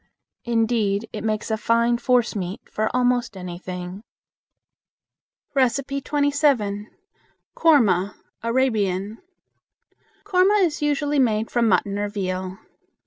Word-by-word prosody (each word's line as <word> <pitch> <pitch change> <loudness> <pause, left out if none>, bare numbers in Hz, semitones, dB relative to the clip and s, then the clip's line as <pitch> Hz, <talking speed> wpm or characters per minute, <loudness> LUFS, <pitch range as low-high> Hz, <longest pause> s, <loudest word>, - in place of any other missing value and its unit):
Indeed, 225 -3 +1
it 210 - -5
makes 215 0 -2
a 220 - +1
fine 235 +1 +2
forcemeat 225 -7 0
for 215 +1 0 0.2
most 245 -4 0
anything. 180 +1 -7 1.5
27. 275 -4 +1 0.7
Koorma 210 - +3 0.3
(Arabian). 220 -4 0 1.0
Koorma 400 +1 +3
is 310 -3 -3
usually 290 0 +1
made 220 -3 +1
from 235 -2 +2
mutton 200 +1 +1
or 205 0 -1
veal. 185 -2 -4
225 Hz, 90 wpm, -23 LUFS, 200-265 Hz, 1.5 s, Koorma